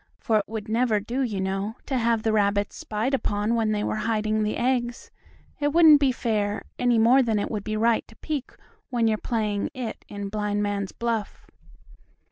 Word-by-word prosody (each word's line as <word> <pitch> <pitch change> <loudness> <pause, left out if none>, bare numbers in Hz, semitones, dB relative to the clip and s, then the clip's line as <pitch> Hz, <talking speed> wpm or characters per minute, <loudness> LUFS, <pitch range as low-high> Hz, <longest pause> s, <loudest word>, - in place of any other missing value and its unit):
For 220 -2 +1
it 205 - -4
would 220 0 -5
never 225 -1 +2
do, 235 +6 -3
you 220 -7 -1
know, 195 +3 -2
to 270 - -2
have 230 -1 +1
the 220 - +1
rabbits 205 -1 +1
spied 220 +6 -2
upon 210 -4 0
when 225 -2 +1
they 210 -1 0
were - - -1
hiding 215 -1 0
the 215 0 -1
eggs. 240 -1 -1 0.5
It 290 -1 0
wouldn't 320 -3 +8
be 275 -2 +3
fair, 210 -4 -1 0.2
any 245 -1 +3
more 240 +4 +6
than 225 -4 +1
it 205 - -2
would 210 -3 -3
be 215 0 -2
right 230 +1 +2
to 225 - -17
peek 290 -1 -4 0.4
when 235 -3 +1
you're 215 -1 +1
"it" 220 +1 -2
in 205 - -10
playing 200 -1 -4
blind 210 -1 -1
man's 200 -1 -2
buff. 230 -3 -3
220 Hz, 195 wpm, -25 LUFS, 210-240 Hz, 0.5 s, wouldn't